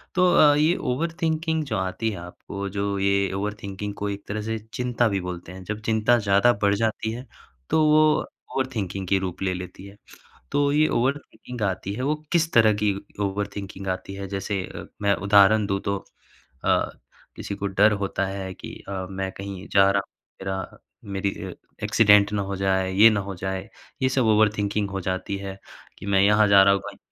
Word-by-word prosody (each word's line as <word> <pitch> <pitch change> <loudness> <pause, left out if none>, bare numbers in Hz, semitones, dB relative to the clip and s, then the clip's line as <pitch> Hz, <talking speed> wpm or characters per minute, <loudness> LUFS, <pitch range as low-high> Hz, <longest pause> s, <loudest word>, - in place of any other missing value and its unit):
तो 180 -1 +4
अ, 145 -1 +6
ये 155 +4 +3
over 155 +7 -1
thinking 160 0 0
जो 110 -7 -2
आती 95 +4 -2
है 100 - -6
आपको, 100 +3 -7
जो 100 +1 -2
ये 100 0 +2
ओवर 105 +2 -2
थिंकिंग 100 +1 -5
को 105 0 -3
एक 100 0 -6
तरह 105 +1 -3
से 110 +1 -3 0.2
चिंता 125 -1 +1
भी 100 -1 0
बोलते 90 -1 -6
हैं। 95 0 -10
जब 110 +3 -5
चिंता 110 +2 +3
ज़्यादा 100 +3 +4
बढ़ 100 0 +4
जाती 110 +1 -1
है, 120 +3 -7 0.4
तो 160 - +3
वो 155 0 +5 0.5
ओवर 130 0 +1
थिंकिंग 95 -2 -3
के 95 - +3
रूप 95 -1 -5
ले 95 -1 0
लेती 90 +1 -8
है। 100 +1 -13 0.6
तो 145 0 +2
ये 155 +1 +4
ओवर 130 +4 +1
थिंकिंग 120 -3 -10
आती 100 -1 -2
है, 125 - -4
वो 145 +3 +1 0.2
किस 165 -1 +2
तरह 110 -2 +6
की 105 -2 +2 0.3
ओवर 100 +1 -1
थिंकिंग 100 -1 -7
आती 95 +1 -4
है? 100 0 -6
जैसे 100 0 -2
अ, - - -9 0.2
मैं 100 -1 +3
उदाहरण 100 +1 +6
दूँ, 100 -1 -1
तो 100 0 -1 0.7
अ, - - +2 0.5
किसी 100 - -5
को 100 - -4
डर 100 +2 +4
होता 100 -1 -1
है 95 -1 -5
कि - - -9 0.2
अ, 95 -1 -4
"मैं 95 0 -3
कहीं 100 0 -7
जा 100 0 +6
रहा 100 0 +1
हूँ, - - -69 0.3
मेरा 95 0 -5 0.2
मेरी 100 0 -2 0.2
अ, - - -7 0.3
एक्सीडेंट 105 -2 +5
ना 105 -1 0
हो 100 0 -4
जाए, 95 -1 +1
ये 105 +4 +7
ना 110 -2 0
हो 100 0 -6
जाए।" 95 +2 -4 0.3
ये 130 - +4
सब 130 -2 +1
ओवर 105 0 +5
थिंकिंग 105 0 0
हो 95 0 -3
जाती 95 +2 -3
है 95 0 -7 0.4
कि - - -9
मैं 100 -1 +3
यहाँ 105 +1 +5
जा 100 -1 +7
रहा 100 0 +5
हूँ, 100 - -1
कहीं 100 -1 -9
100 Hz, 210 wpm, -24 LUFS, 95-110 Hz, 0.7 s, ये